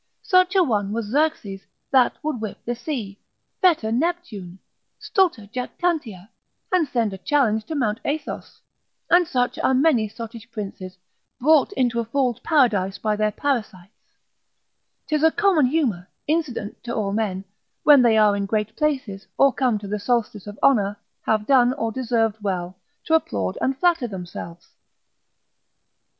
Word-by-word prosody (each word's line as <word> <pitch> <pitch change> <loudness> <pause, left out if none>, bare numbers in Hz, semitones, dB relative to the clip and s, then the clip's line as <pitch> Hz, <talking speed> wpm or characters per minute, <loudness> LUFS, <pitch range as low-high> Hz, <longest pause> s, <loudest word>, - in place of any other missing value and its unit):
Such 370 -3 +3
a 375 - +6
one 205 - 0
was 230 -1 -2
Xerxes, 225 -6 -1 0.3
that 260 -3 +4
would 300 -7 -3
whip 215 -2 -5
the 240 - -1
sea, 235 -6 -5 0.4
fetter 315 -12 +3
Neptune, 240 - -3 0.4
stulta 355 - +1
jactantia, 250 - -3 0.4
and 360 -4 +2
send 230 -6 -1
a 190 - -8
challenge 220 -5 +1
to 320 - -5
Mount 225 -6 0
Athos; 295 +1 -5 0.5
and 350 -1 +5
such 250 -6 -1
are 265 - +2
many 260 -6 +3
sottish 230 0 -9
princes, 195 -4 -7 0.4
brought 305 +5 +4
into 245 -7 0
a 230 - -1
fool's 250 0 0
paradise 215 - +2
by 215 -1 -1
their 215 0 +1
parasites, 215 -7 -3 1.1
'tis 305 -1 0
a 320 - +6
common 340 -7 +3
humour, 245 - -1 0.2
incident 295 -9 -2
to 235 0 -4
all 200 -3 -1
men, 200 -3 -2 0.4
when 290 -3 +7
they 230 -2 +4
are 210 -1 +5
in 200 -1 -2
great 210 0 -2
places, 260 -10 -2
or 275 -1 +5
come 250 -5 +1
to 205 -1 -8
the 210 +1 -3
solstice 215 -3 -1
of 205 0 -8
honour, 205 -6 +3 0.3
have 215 -1 +1
done, 255 -1 +4
or 225 -5 -2
deserved 225 -3 -1
well, 185 -2 -3 0.3
to 320 - -1
applaud 100 - 0
and 265 0 0
flatter 335 -5 +2
themselves. 175 -3 -8
235 Hz, 150 wpm, -23 LUFS, 205-290 Hz, 1.1 s, when